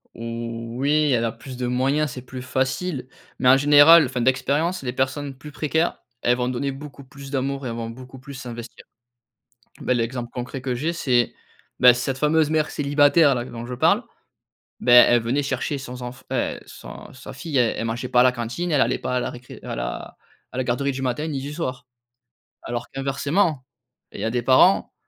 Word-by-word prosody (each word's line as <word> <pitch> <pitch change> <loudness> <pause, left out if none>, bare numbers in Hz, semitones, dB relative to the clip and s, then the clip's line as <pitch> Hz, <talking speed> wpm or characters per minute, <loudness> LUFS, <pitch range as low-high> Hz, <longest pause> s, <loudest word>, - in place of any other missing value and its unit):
Oh - - -11 0.6
oui, 150 +2 +2
elle 115 -2 +2
a 115 - -1
plus 130 +2 -10
de 125 - -2
moyens. 135 +4 +1
C'est 125 - -7
plus 125 0 -9
facile, 130 +3 -2 0.3
mais 125 - +4
en 130 - +8
général, 145 +4 +7
enfin, 125 -1 -3
d'expérience, 140 +7 +1
les 125 -1 -3
personnes 135 +2 -2
plus 145 +3 -12
précaires, 160 +3 0 0.2
elles 120 0 +2
vont 125 0 -1
donner 135 +2 -2
beaucoup 140 +1 -10
plus 135 +1 -12
d'amour 135 0 -2
et - - -2
elles 115 - -4
vont 115 -1 -4
beaucoup 130 +2 -11
plus 140 +2 -10
s'investir. 120 -3 -9 1.0
Beh, - - +1
l'exemple 120 0 -2
concret 125 +1 -6
que 130 -1 -2
j'ai, 155 +8 -2
c'est, 125 -8 +1 0.5
bah, 125 -1 +8
cette 130 +2 -2
fameuse 150 +1 +2
mère 155 -1 +1
célibataire, 145 +1 +4
là, 120 - -2
dont 120 -1 -8
je 125 - -6
parle, 125 - +3 0.8
beh, 125 - +2
elle 120 0 +8
venait 125 +5 0
chercher 145 +1 -2
sons 125 -2 -8
enf 125 +1 -8
heu, - - -1
son - - -11
sa - - -10
fille. 155 -5 -3
Elle, 120 -2 +2
elle - - -3
mangeait 115 +3 -3
pas 125 - +4
à - - +8
la 130 0 +4
cantine. 125 +9 -4
Elle 145 - +3
allait - - +2
pas 125 - -2
à - - +1
la - - -2
récré 125 +1 -11
à - - -5
la - - -5 0.4
à - - -8
la 130 - -1
garderie 130 +3 0
du 135 0 -5
matin, 130 +4 -1
ni 140 -3 -3
du 145 +2 -6
soir. 130 -6 -4 0.8
Alors 120 0 -5
qu'inversement, 140 +2 -1 0.5
il - - -8
y - - -2
a 110 - 0
des 120 +1 -1
parents 130 +10 +4
130 Hz, 205 wpm, -23 LUFS, 125-145 Hz, 1.0 s, en